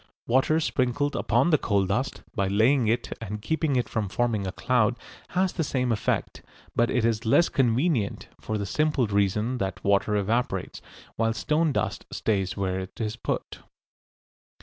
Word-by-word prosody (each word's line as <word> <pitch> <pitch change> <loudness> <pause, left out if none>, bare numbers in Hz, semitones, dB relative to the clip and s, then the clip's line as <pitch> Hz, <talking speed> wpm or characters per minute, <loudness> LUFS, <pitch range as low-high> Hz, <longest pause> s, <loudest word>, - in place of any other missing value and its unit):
Water 135 +6 +3
sprinkled 145 -1 0
upon 175 - +2
the 155 - +4
coal 100 -2 +1
dust, 105 +8 -2
by 100 -5 0
laying 115 +5 +3
it 115 +2 0
and 105 -1 -5
keeping 145 +5 0
it 125 - +1
from 105 -3 -2
forming 110 -2 0
a - - -2
cloud, 120 +1 +1 0.4
has 185 0 +2
the 165 - -1
same 125 -4 0
effect, 110 - -1 0.3
but 120 0 +3
it 120 -3 +1
is 115 -1 0
less 125 +9 +4
convenient, 125 - +1
for 110 - -3
the 100 - -3
simple 150 +3 +1
reason 105 +4 0
that 95 -2 -3
water 100 +1 +2
evaporates, 110 +5 -1 0.4
while 115 0 +1
stone 150 - +1
dust 105 -4 -2
stays 95 -3 -1
where 95 -1 -1
it 95 0 -8
is 110 -1 -2
put. - - -4
115 Hz, 165 wpm, -26 LUFS, 100-130 Hz, 0.4 s, the